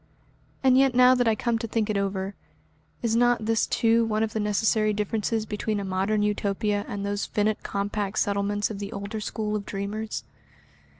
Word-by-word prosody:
And 260 -1 +5
yet 270 -2 +3
now 250 0 +7
that 245 -2 +2
I 225 - +3
come 235 +1 0
to 230 - -4
think 220 -1 0
it 215 - -1
over, 195 0 -1 0.7
is 225 -1 +1
not 240 -2 +3
this 225 0 +2
too 230 0 +3
one 220 -1 0
of 220 0 -2
the 220 - -1
necessary 215 +1 +2
differences 215 +1 -1
between 210 0 -2
a 200 - -4
Modern 195 +3 0
Utopia 205 0 0
and 200 0 -4
those 205 0 -2
finite 210 0 0
compact 200 0 -3
settlements 205 +1 0
of 200 - -6
the 200 -1 -5
older 200 +2 -5
school 210 0 -3
of 210 - -2
dreamers? 210 +2 -4
210 Hz, 185 wpm, -26 LUFS, 200-225 Hz, 0.7 s, now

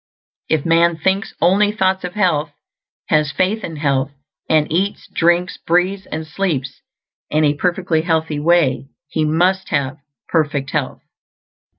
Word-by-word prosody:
If 155 -3 +1
man 170 0 +3
thinks 190 +4 -1
only 205 +3 +4
thoughts 190 -2 0
of 180 +1 -5
health, 160 -7 +1 0.6
has 150 -2 +2
faith 205 +7 0
in 165 - -5
health, 140 -2 0 0.4
and 155 -1 +4
eats, 190 +5 -1
drinks, 175 +1 +2
breathes, 185 +3 0
and 160 0 -5
sleeps 150 -6 -3 0.5
in 155 +1 +2
a 145 - +3
perfectly 175 0 0
healthy 160 -2 -1
way, 155 -4 +2 0.2
he 155 - -1
must 180 +5 +1
have 140 0 -1 0.3
perfect 145 -4 0
health. - - -3
165 Hz, 135 wpm, -19 LUFS, 150-185 Hz, 0.6 s, only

